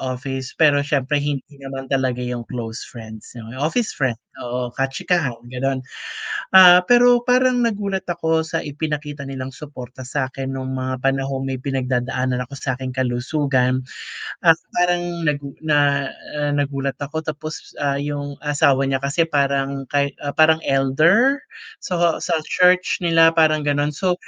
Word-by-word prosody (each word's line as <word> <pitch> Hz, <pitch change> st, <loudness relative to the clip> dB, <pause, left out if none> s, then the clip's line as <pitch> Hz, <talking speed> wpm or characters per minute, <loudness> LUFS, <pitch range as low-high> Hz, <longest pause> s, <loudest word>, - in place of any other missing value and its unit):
office 130 Hz, 0 st, -5 dB
pero 145 Hz, -3 st, +4 dB
siyempre 145 Hz, 0 st, 0 dB
hindi 145 Hz, -2 st, -2 dB, 0.2 s
naman 135 Hz, 0 st, -7 dB
talaga 130 Hz, -2 st, 0 dB
yung 125 Hz, -1 st, -3 dB
close 115 Hz, -2 st, -5 dB
friends, 110 Hz, -2 st, -11 dB
'noh, 115 Hz, -1 st, -9 dB
office 215 Hz, +10 st, 0 dB
friend 130 Hz, -4 st, -1 dB, 0.2 s
oo, 125 Hz, +1 st, -4 dB
kachikahan, 135 Hz, +3 st, 0 dB, 0.2 s
ganon. 130 Hz, +2 st, -2 dB, 0.7 s
Ah, 180 Hz, -1 st, +9 dB
pero 245 Hz, +4 st, +5 dB
parang 250 Hz, 0 st, +3 dB
nagulat 205 Hz, -4 st, -1 dB
ako 165 Hz, -2 st, +1 dB
sa 160 Hz, 0 st, -3 dB
ipinakita 150 Hz, -1 st, -4 dB
nilang 135 Hz, -1 st, -6 dB
suporta 130 Hz, -3 st, -10 dB
sakin 130 Hz, 0 st, -3 dB
nung 130 Hz, 0 st, -4 dB
mga 130 Hz, 0 st, -3 dB
panahong 135 Hz, 0 st, 0 dB
may 130 Hz, -1 st, -4 dB
pinagdadaanan 130 Hz, -1 st, -1 dB
ako 125 Hz, +2 st, -8 dB
sa 130 Hz, -1 st, -2 dB
'king 130 Hz, 0 st, -5 dB
kalusugan 130 Hz, 0 st, 0 dB, 0.6 s
at 165 Hz, -, +9 dB, 0.2 s
parang 175 Hz, -1 st, 0 dB
nag 150 Hz, -1 st, +2 dB, 0.2 s
na 145 Hz, -2 st, +2 dB, 0.3 s
ah, 145 Hz, 0 st, 0 dB
nagulat 140 Hz, -1 st, -1 dB
ako. 145 Hz, +3 st, -4 dB
Tapos, 155 Hz, 0 st, -6 dB
ah, 140 Hz, -1 st, +1 dB
yung 145 Hz, 0 st, -4 dB
asawa 140 Hz, -2 st, +3 dB
niya 135 Hz, 0 st, -1 dB
kasi 145 Hz, +4 st, +1 dB
parang 140 Hz, -2 st, -1 dB
kay 140 Hz, -1 st, +1 dB, 0.2 s
parang 160 Hz, +1 st, +5 dB
elder. 165 Hz, -, +3 dB, 0.4 s
So, 175 Hz, -2 st, 0 dB
sa -, -, 0 dB
church 180 Hz, 0 st, +3 dB
nila 165 Hz, -1 st, +5 dB
parang 155 Hz, -2 st, +3 dB
gano'n. 145 Hz, 0 st, +1 dB
So, 180 Hz, +5 st, 0 dB
140 Hz, 145 wpm, -21 LUFS, 130-160 Hz, 0.7 s, Ah